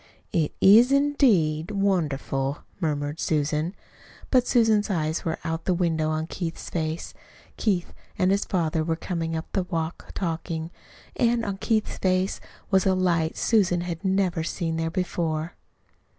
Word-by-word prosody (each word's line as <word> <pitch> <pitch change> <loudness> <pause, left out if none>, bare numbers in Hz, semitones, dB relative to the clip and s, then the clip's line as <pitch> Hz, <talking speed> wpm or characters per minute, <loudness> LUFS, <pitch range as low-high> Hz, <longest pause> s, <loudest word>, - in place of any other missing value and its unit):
"It 160 -5 +1
is, 225 +7 +7
indeed 220 - +3
wonderful," 150 -9 -1 0.2
murmured 150 -2 -2
Susan. 155 +3 0 0.6
But 250 -2 +4
Susan's 220 -3 +3
eyes 160 -4 -1
were 160 -1 -2
out 165 0 -3
the 185 - +2
window 160 -3 +1
on 155 0 -1
Keith's 170 0 -5
face 160 -1 -3 0.4
Keith 190 -6 0 0.2
and 185 -2 +3
his 200 +1 +2
father 165 -3 0
were 165 0 0
coming 165 -1 -3
up 160 - -3
the 195 - +1
walk 165 -2 -4
talking; 165 -2 -3 0.4
and 235 -1 +2
on 200 -2 -3
Keith's 215 +1 -1
face 185 0 +1 0.3
was 190 -1 +4
a 190 - +3
light 170 -3 +1
Susan 185 -6 +2
had 175 0 -5
never 190 -4 +1
seen 165 -1 -2
there 165 0 -1
before. 165 -2 -2
170 Hz, 145 wpm, -25 LUFS, 160-195 Hz, 0.6 s, is